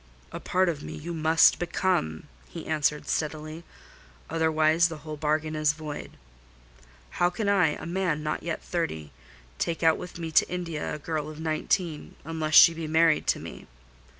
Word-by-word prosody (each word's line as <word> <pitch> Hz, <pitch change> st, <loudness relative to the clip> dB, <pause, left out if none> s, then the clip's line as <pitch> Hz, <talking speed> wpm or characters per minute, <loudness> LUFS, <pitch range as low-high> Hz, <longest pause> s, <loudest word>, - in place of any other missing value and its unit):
"A -, -, -6 dB
part 185 Hz, +1 st, +1 dB
of 160 Hz, -4 st, -2 dB
me -, -, -7 dB
you 170 Hz, +3 st, -6 dB
must 160 Hz, 0 st, +4 dB
become," 175 Hz, -, -1 dB, 0.3 s
he -, -, -8 dB
answered 150 Hz, -1 st, 0 dB
steadily; 155 Hz, +1 st, -3 dB, 0.7 s
"otherwise 160 Hz, +1 st, +3 dB
the 165 Hz, -2 st, -7 dB
whole 155 Hz, -1 st, -5 dB
bargain 155 Hz, +1 st, -1 dB
is 155 Hz, -1 st, +2 dB
void. 150 Hz, -1 st, -8 dB, 1.0 s
How 175 Hz, -, +5 dB
can 200 Hz, +4 st, -3 dB
I, 190 Hz, -7 st, +3 dB
a -, -, -8 dB
man 170 Hz, -3 st, -1 dB
not 150 Hz, 0 st, -2 dB
yet 170 Hz, -1 st, -4 dB
thirty, 110 Hz, -, -3 dB, 0.5 s
take 170 Hz, -1 st, -2 dB
out 160 Hz, -1 st, +4 dB
with 180 Hz, -, -8 dB
me 165 Hz, -2 st, -5 dB
to -, -, +4 dB
India 170 Hz, -5 st, -4 dB
a -, -, -5 dB
girl 155 Hz, -1 st, -4 dB
of 155 Hz, 0 st, -10 dB
nineteen, 160 Hz, +1 st, -2 dB
unless 160 Hz, -1 st, -2 dB
she 165 Hz, -, +9 dB
be 165 Hz, -1 st, -5 dB
married 160 Hz, 0 st, +3 dB
to -, -, +2 dB
me? -, -, -10 dB
160 Hz, 170 wpm, -27 LUFS, 155-170 Hz, 1.0 s, she